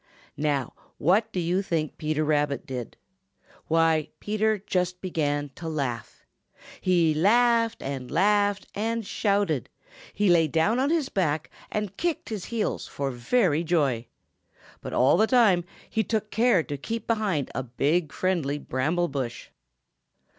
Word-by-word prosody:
Now, 145 -4 -1 0.2
what 195 +8 +2
do 185 - -2
you 175 +3 +1
think 160 -5 -2
Peter 155 0 0
Rabbit 145 -2 0
did? 125 -3 -6 0.7
Why, 160 -1 +2
Peter 215 +1 +1
just 180 -2 -2
began 145 -5 -1
to 165 +3 -6
laugh. 135 -7 -4 0.6
He 170 -4 +3
laughed 230 +6 +3
and 135 -2 -5
laughed 205 +4 +2
and 225 +1 -2
shouted! 200 - 0 0.4
He 205 0 0
lay 170 -3 +5
down 165 - +2
on 275 +2 +2
his 315 -4 +1
back 160 -5 -1 0.2
and 210 -2 -3
kicked 345 -3 -2
his 210 -5 -4
heels 230 -2 -2
for 140 -1 -3
very 155 - +1
joy! 140 -9 +1 0.7
But - - -6
all 130 +6 +4
the 220 +3 +4
time 215 -9 +4 0.2
he 220 - 0
took 215 0 -2
care 225 -7 +3
to 145 -2 -5
keep 225 +11 -4
behind 210 - 0
a 130 - -2
big, 140 +6 0
friendly 165 -6 0
bramble 155 +6 -1
bush. 130 -5 -5
175 Hz, 140 wpm, -26 LUFS, 145-210 Hz, 0.7 s, lay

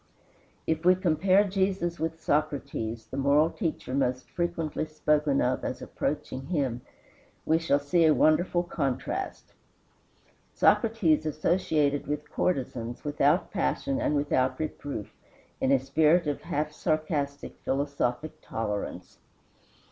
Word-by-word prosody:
If 160 0 -1
we 180 +1 +6
compare 185 +2 +3
Jesus 190 -3 -1
with 160 0 -2
Socrates, 140 -8 -1
the 130 - -7
moral 145 +4 +3
teacher 165 - -3
most 130 -2 0
frequently 170 -3 -2
spoken 150 -2 +1
of 125 - 0
as - - -3
approaching 130 +1 -4
him, 135 -8 -1 0.6
we 160 +1 +3
shall 160 -4 +2
see 145 +4 +2
a 155 - +6
wonderful 175 +3 +3
contrast. 165 - -3 1.0
Socrates 180 -10 +3
associated 155 -2 +1
with 150 +1 -4
courtesans, 125 -8 -2
without 145 +3 +2
passion 275 0 -1
and 150 - +1
without 130 -3 +1
reproof, 145 -7 -5 0.5
in 130 - +1
a 135 - +6
spirit 155 +6 +3
of 145 -1 -2
half 155 -2 -2
sarcastic, 150 -3 -2
philosophic 140 +2 -2
tolerance. 105 -2 -4
150 Hz, 115 wpm, -28 LUFS, 140-170 Hz, 1.0 s, we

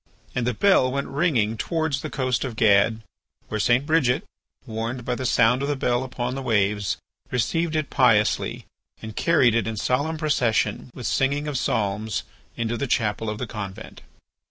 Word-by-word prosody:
And 125 -1 -1
the 125 - 0
bell 130 - +4
went 140 +1 -2
ringing 135 -8 +1
towards 160 0 -1
the - - -5
coast 130 -2 -1
of 125 -4 -4
Gad, 110 +1 +3 0.5
where 110 - -2
St. 120 +6 +3
Bridget, 150 -1 +2 0.4
warned 115 +1 -4
by 125 - 0
the 130 +1 -2
sound 125 +4 +3
of 140 - -1
the 145 - 0
bell 125 -1 0
upon 125 -1 -3
the 135 - -4
waves, 105 -4 +1 0.3
received 160 +7 0
it 155 -2 -1
piously, 105 -6 +2 0.4
and 110 -1 -7
carried 145 -9 +3
it 115 -1 +1
in 110 -1 -3
solemn 145 +9 0
procession 130 -8 0
with 125 - -7
singing 140 +5 +1
of 150 - -3
psalms 105 -3 -1 0.3
into 115 0 -1
the 140 - -2
chapel 110 -1 0
of 105 - -3
the 125 - -3
convent. 100 -4 -8
125 Hz, 175 wpm, -24 LUFS, 110-140 Hz, 0.5 s, bell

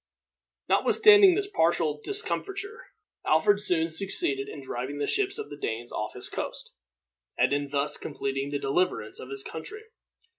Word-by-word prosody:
Notwithstanding 410 -4 +6
this 405 +1 0
partial 165 - +1
discomfiture, 410 +2 -3 0.4
Alfred 200 +7 +3
soon 170 -5 +1
succeeded 160 -5 -1
in 150 - -8
driving 130 +2 -5
the 145 - -1
ships 400 0 0
of 435 - -7
the - - -7
Danes 115 +2 -3
off - - -4
his - - -4
coast, - - -6 0.6
and - - +3
in 145 0 -1
thus 140 +1 0
completing 135 -1 -3
the 145 - -2
deliverance 140 -5 -1
of 130 - -9
his 135 0 -4
country. 425 - -7
160 Hz, 150 wpm, -27 LUFS, -, 0.6 s, Notwithstanding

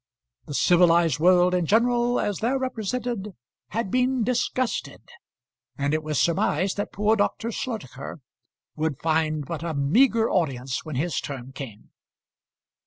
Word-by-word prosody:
The 145 - -5
civilised 170 -4 +4
world 180 +1 +5
in 180 -3 +1
general, 240 +3 +2
as 205 -3 -1
there 250 +4 +1
represented, 235 -4 -3 0.3
had 225 -4 -3
been 255 -1 +2
disgusted, 250 +1 -1 0.7
and 140 0 0
it 155 - +1
was 155 -2 -2
surmised 170 +3 +1
that 205 - -3
poor 210 +2 +2
Dr. 225 +2 -1
Slotacher 195 - -6 0.6
would 155 -3 -1
find 155 -1 0
but 160 +1 -5
a 165 -2 -3
meagre 225 - +3
audience 135 -7 -1
when 155 -3 -6
his 160 +5 -1
turn 135 -2 -7
came. 130 -6 -9
180 Hz, 135 wpm, -25 LUFS, 150-230 Hz, 0.7 s, world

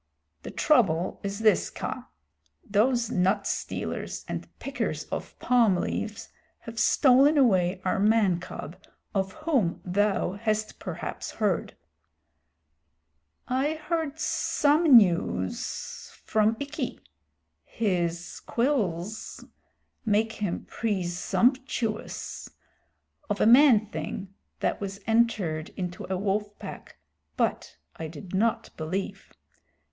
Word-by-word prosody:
"The - - -7
trouble 185 - +2
is 200 +1 -4
this, 215 -3 +4
Kaa. - - -6 0.6
Those 235 +3 +2
nut 195 +1 +2
stealers - - -3
and - - -4
pickers - - -3
of - - -5
palm 235 -6 +4
leaves 210 +3 -3 0.3
have 230 -1 -7
stolen 275 +5 +5
away 190 -8 +3
our 185 - +1
man 205 -4 +3
cub 170 -2 -8 0.4
of 190 -2 -1
whom 245 - +1
thou 200 0 +1
hast 215 +1 -2
perhaps - - -5
heard." 205 -5 -1 1.7
"I 270 +5 0
heard 315 -1 -2
some 300 -3 +4
news 170 - 0 0.2
from 220 +1 +2
Ikki 280 -2 -4 0.6
(his 175 -5 -2
quills 215 - -2 0.6
make 220 0 +2
him 205 -5 -3
presumptuous) 225 +4 -1 0.8
of 205 - -1
a - - +4
man 240 -2 +7
thing 190 +1 -6 0.3
that - - 0
was 195 0 -5
entered 215 -9 +1
into 180 -1 -4
a 190 - +1
wolf 205 +2 -1
pack, - - -9 0.4
but - - -1 0.2
I 160 - -4
did 165 +4 -10
not 220 +4 +1
believe. 175 +5 -4
210 Hz, 105 wpm, -27 LUFS, 185-240 Hz, 1.7 s, man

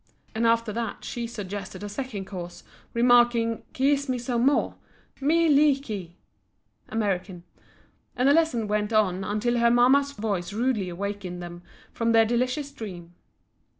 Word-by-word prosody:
And 230 +1 +1
after 230 -1 +2
that 230 +1 -4
she 235 -1 -4
suggested 205 -3 -7
a - - -4
second 210 -2 -5
course, 175 -2 -8 0.3
remarking 240 -1 +4
"kee 275 +2 +2
es 285 -1 -2
me 255 - 0
some 240 0 0
more, 285 - +2 0.5
Mee 325 +4 +3
lee 290 -2 +4
kee!" 200 -10 -7 0.7
(American). 195 -5 -2 0.7
And 250 - +2
the 280 - +6
lesson 300 -9 +2
went 210 +1 -1
on 195 -4 +2
until 235 +4 0
her 235 0 +4
mamma's 265 +4 +4
voice 200 -5 -3
rudely 220 -4 0
awakened 190 0 -5
them 175 0 -9 0.3
from 230 0 0
their 225 0 +6
delicious 255 +5 -1
dream. 180 -10 -9
230 Hz, 150 wpm, -26 LUFS, 200-255 Hz, 0.7 s, the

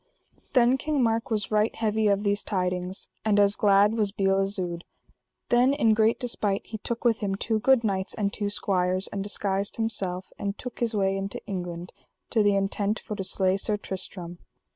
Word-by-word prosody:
Then 250 +1 +4
King 300 -3 0
Mark 225 0 0
was 215 -3 -1
right 215 +1 +2
heavy 220 -1 +1
of 200 0 +2
these 205 0 +1
tidings, 180 0 -2 0.2
and 210 -2 +3
as 200 0 +4
glad 205 +1 +4
was 215 -3 +1
La - - -48
Beale 195 0 +3
Isoud. 185 -4 -1 0.7
Then 245 +3 +4
in 230 -6 +4
great 220 +1 +3
despite 210 -5 -1
he 220 - -7
took 235 +3 -4
with 230 -2 +3
him 195 -2 -1
two 220 +2 -1
good 260 +1 +4
knights 195 -3 -1
and 200 -2 -1
two 205 -1 -2
squires, 185 -2 0
and 200 - -4
disguised 200 0 -2
himself, 195 -5 -2
and 200 0 -3
took 250 -2 -8
his 235 -2 0
way 195 -1 +1
into 195 0 -5
England, 175 -2 -5 0.4
to 225 - +3
the 205 -1 +3
intent 200 +2 0
for 210 - -6
to 195 - -4
slay 190 0 +1
Sir 210 +1 -1
Tristram. 180 -3 -4
205 Hz, 190 wpm, -26 LUFS, 195-220 Hz, 0.7 s, Then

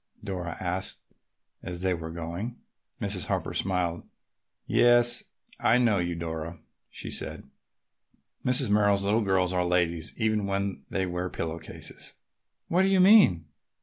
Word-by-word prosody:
Dora 90 -4 -4
asked 90 +1 -3 0.6
as 90 -1 -6
they 95 -1 +1
were 80 -2 -5
going. 85 +8 -5 0.4
Mrs. - - -2
Harper - - -2
smiled. 90 -3 -1 0.6
"Yes, 120 0 +5 0.3
I 120 - +4
know 115 -5 +3
you, 85 -1 -1
Dora," 80 0 -5 0.3
she - - -7
said. - - -2 1.0
"Mrs. 125 -3 +2
Merrill's 100 -1 +3
little 105 +3 +2
girls 95 -2 +1
are 90 -1 +1
ladies 85 -2 0
even 110 -3 0
when 100 0 -2
they 95 -1 -1
wear 90 0 -3
pillow 85 -1 -4
cases." - - -8 0.5
"What 175 +3 +2
did 190 - +3
she - - +5
mean?" 185 - +6
95 Hz, 140 wpm, -27 LUFS, 85-110 Hz, 1.0 s, mean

